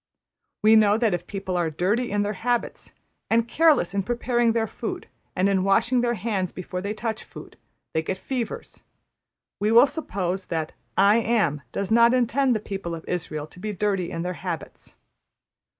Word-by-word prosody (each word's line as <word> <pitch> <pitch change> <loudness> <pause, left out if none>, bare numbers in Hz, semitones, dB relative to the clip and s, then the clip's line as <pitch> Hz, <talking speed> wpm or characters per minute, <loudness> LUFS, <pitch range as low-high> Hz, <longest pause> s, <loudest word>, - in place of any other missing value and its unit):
We 220 +1 +7
know 210 -1 +5
that 225 -4 +1
if 175 0 -3
people 190 -2 -4
are 175 -2 +1
dirty 200 +10 0
in 205 0 +1
their 205 +1 -2
habits 240 +3 -2 0.3
and 230 +1 +2
careless 295 - +3
in 200 - +1
preparing 240 +2 +1
their 225 -1 +1
food - - -6 0.3
and 185 +2 +2
in 195 -2 +2
washing 240 +6 +3
their 240 0 +1
hands 205 -5 -2
before 180 0 -5
they 200 +2 -3
touch 220 -1 -3
food, - - -12 0.4
they 160 - +1
get 185 +4 -3
fevers; 260 - -5 0.8
we 210 +2 +1
will 235 +4 +8
suppose 195 - -3
that 160 -2 -2 0.3
`I 205 +4 +5
Am' 205 -11 +1
does 200 0 -3
not 235 +2 +6
intend 255 +1 +2
the - - 0
people 195 -5 -5
of 165 - -10
Israël 155 -4 -3
to - - -13
be 210 +2 -4
dirty 195 -3 -1
in 165 - -4
their 180 0 -2
habits. 175 -3 -6
205 Hz, 180 wpm, -24 LUFS, 180-235 Hz, 0.8 s, will